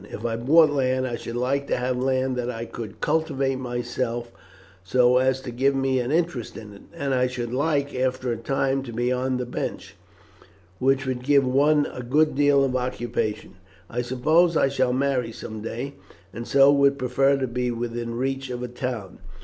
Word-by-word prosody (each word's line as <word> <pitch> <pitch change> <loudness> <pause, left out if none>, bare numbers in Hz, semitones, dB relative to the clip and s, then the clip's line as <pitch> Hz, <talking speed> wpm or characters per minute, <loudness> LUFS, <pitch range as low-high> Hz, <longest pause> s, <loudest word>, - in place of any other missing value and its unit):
If 110 - -7
I 115 -1 0
bought 150 +7 +5
land, 130 -2 +1
I 120 -2 -2
should 115 0 -7
like 135 +3 0
to - - 0
have 125 +1 -1
land 130 0 0
that 125 -1 -2
I 115 -1 -4
could 115 -2 -8
cultivate 140 -4 0
myself, 120 -1 -3 0.5
so 125 +5 +4
as 130 0 +2
to 125 - -6
give 135 +3 +1
me 135 -1 +1
an 125 +2 -2
interest 165 -7 -1
in 105 -2 -10
it, 100 - -14
and 140 -4 -2
I 125 0 +2
should 120 -2 -4
like, 145 +1 0
after 130 -1 -1
a 115 - -2
time, 135 +3 0
to 130 -3 -8
be 120 +2 0
on 130 0 0
the 125 - -3
bench, 120 - -5 0.8
which 135 +1 +2
would 130 -1 -2
give 140 +1 +3
one 145 +3 +3
a 125 - -6
good 150 +6 +2
deal 145 0 +4
of 130 -2 0
occupation. 120 -5 -3 0.3
I 120 +1 -1
suppose 155 +8 +2
I 135 - +3
shall 130 -2 +1
marry 130 -2 0
some 110 -1 -8
day, 120 +5 -5 0.4
and 115 +3 -6
so 140 0 +6
would 140 -1 +3
prefer 135 +2 +2
to 135 - -1
be 125 0 -2
within 115 0 -4
reach 135 +1 -2
of 125 0 -4
a - - -3
town. 120 -5 -5
130 Hz, 195 wpm, -24 LUFS, 120-135 Hz, 0.8 s, so